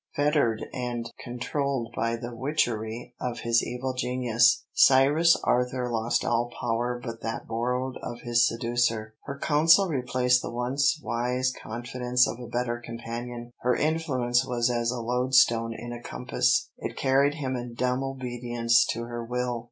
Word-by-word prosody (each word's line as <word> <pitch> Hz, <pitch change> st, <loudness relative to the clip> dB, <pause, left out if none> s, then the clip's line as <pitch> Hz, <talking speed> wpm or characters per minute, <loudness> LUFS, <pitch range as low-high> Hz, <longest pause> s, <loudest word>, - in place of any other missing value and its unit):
Fettered 145 Hz, -6 st, +1 dB
and 120 Hz, -2 st, -4 dB
controlled 125 Hz, 0 st, -3 dB
by 115 Hz, 0 st, 0 dB
the 120 Hz, +1 st, -7 dB
witchery 120 Hz, -3 st, -2 dB
of 125 Hz, -1 st, -3 dB
his 115 Hz, 0 st, +3 dB
evil 130 Hz, +2 st, -3 dB
genius, 125 Hz, -1 st, +2 dB
Cyrus 145 Hz, +6 st, +5 dB
Arthur 125 Hz, 0 st, 0 dB
lost 115 Hz, 0 st, 0 dB
all 120 Hz, +1 st, +1 dB
power 120 Hz, +1 st, -1 dB
but 115 Hz, -1 st, -7 dB
that 115 Hz, -, -4 dB
borrowed 125 Hz, +3 st, -2 dB
of 120 Hz, 0 st, -6 dB
his 120 Hz, 0 st, +3 dB
seducer. 115 Hz, -2 st, -1 dB
Her 140 Hz, -, -5 dB
counsel 160 Hz, +7 st, +4 dB
replaced 125 Hz, -3 st, +2 dB
the -, -, -5 dB
once 135 Hz, +6 st, +1 dB
wise 125 Hz, +3 st, 0 dB
confidence 125 Hz, +2 st, 0 dB
of 120 Hz, -, -5 dB
a 120 Hz, -, -7 dB
better 120 Hz, 0 st, -2 dB
companion. 120 Hz, +1 st, -6 dB
Her 125 Hz, 0 st, +1 dB
influence 135 Hz, -6 st, +1 dB
was 120 Hz, 0 st, 0 dB
as 120 Hz, -1 st, 0 dB
a 125 Hz, 0 st, -2 dB
loadstone 120 Hz, -1 st, +3 dB
in 120 Hz, +1 st, -7 dB
a 120 Hz, -, -8 dB
compass, 375 Hz, -, 0 dB
it -, -, -5 dB
carried 140 Hz, +2 st, +3 dB
him 135 Hz, -4 st, -3 dB
in 120 Hz, -1 st, -6 dB
dumb 125 Hz, +2 st, 0 dB
obedience 120 Hz, -3 st, +1 dB
to 115 Hz, -, -5 dB
her 120 Hz, 0 st, -5 dB
will. 125 Hz, 0 st, -2 dB
120 Hz, 150 wpm, -27 LUFS, 120-130 Hz, -, Cyrus